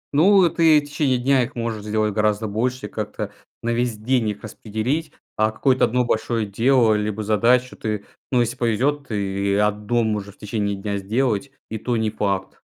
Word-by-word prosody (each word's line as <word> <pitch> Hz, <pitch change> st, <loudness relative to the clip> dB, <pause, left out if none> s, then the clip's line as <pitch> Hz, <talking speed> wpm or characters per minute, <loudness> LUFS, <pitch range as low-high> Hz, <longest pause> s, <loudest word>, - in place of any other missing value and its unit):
Ну, 190 Hz, +4 st, +6 dB
ты 160 Hz, -2 st, +5 dB
и -, -, +3 dB
в -, -, -13 dB
течение 145 Hz, -3 st, +1 dB
дня 130 Hz, +2 st, +3 dB
их 125 Hz, +3 st, -4 dB
можешь 115 Hz, -3 st, -3 dB
сделать 105 Hz, 0 st, 0 dB
гораздо 105 Hz, 0 st, +1 dB
больше, 125 Hz, +5 st, -2 dB
как-то 105 Hz, -1 st, -5 dB, 0.3 s
на 115 Hz, -, 0 dB
весь 120 Hz, -1 st, 0 dB
день 115 Hz, +1 st, +1 dB
их 105 Hz, -1 st, -6 dB
распределить, 110 Hz, +9 st, -3 dB, 0.3 s
а 110 Hz, 0 st, +3 dB
какое-то 130 Hz, +4 st, +2 dB
1 125 Hz, +2 st, +1 dB
большое 115 Hz, -1 st, 0 dB
дело 115 Hz, +3 st, +3 dB
либо 105 Hz, 0 st, -1 dB
задачу 120 Hz, +4 st, +2 dB
ты, 105 Hz, -2 st, -3 dB, 0.3 s
ну, 125 Hz, -, +3 dB
если 120 Hz, +2 st, -1 dB
повезет, 130 Hz, +4 st, 0 dB
ты 100 Hz, -2 st, -1 dB
1 105 Hz, +3 st, +1 dB
можешь 105 Hz, -2 st, -3 dB
в -, -, -37 dB
течение 105 Hz, -1 st, -2 dB
дня 100 Hz, +1 st, -3 dB
сделать. 115 Hz, +5 st, -1 dB, 0.2 s
И 110 Hz, -, -3 dB
то 120 Hz, +2 st, -1 dB
не 110 Hz, -1 st, 0 dB
факт. 100 Hz, -3 st, -2 dB
110 Hz, 185 wpm, -22 LUFS, 105-125 Hz, 0.3 s, Ну